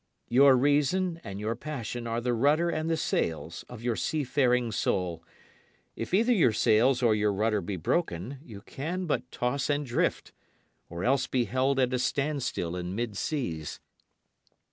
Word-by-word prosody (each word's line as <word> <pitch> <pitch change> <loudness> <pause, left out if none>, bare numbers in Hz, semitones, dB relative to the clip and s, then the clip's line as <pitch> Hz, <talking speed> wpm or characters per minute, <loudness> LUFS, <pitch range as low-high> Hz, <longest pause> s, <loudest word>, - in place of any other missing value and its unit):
Your 135 +2 +6
reason 150 +6 +1
and 100 0 -6
your 110 +2 -2
passion 120 -3 -5
are 115 0 -1
the 120 +1 -1
rudder 150 +8 +2
and 155 0 -2
the 165 - +1
sails 80 - -2
of 115 -2 -10
your 120 -2 0
seafaring 125 -5 +1
soul. 90 -5 -1 0.7
If - - -5
either 225 +7 +4
your 160 - +4
sails 120 +4 +3
or 115 -2 +5
your 105 0 +2
rudder 105 +1 +1
be 95 +3 -4
broken, 110 - -2
you 105 -8 -11
can 170 - -4
but 125 -6 -2
toss 125 +4 -1
and 145 0 0
drift, 120 - -1 0.6
or 85 +2 -5
else 135 +1 +2
be 125 -2 +1
held 130 +2 +1
at 130 -1 +2
a 125 - +1
standstill 135 - -1
in 90 +1 -4
mid 115 -2 -3
seas. 85 - -3
125 Hz, 165 wpm, -28 LUFS, 105-145 Hz, 0.7 s, Your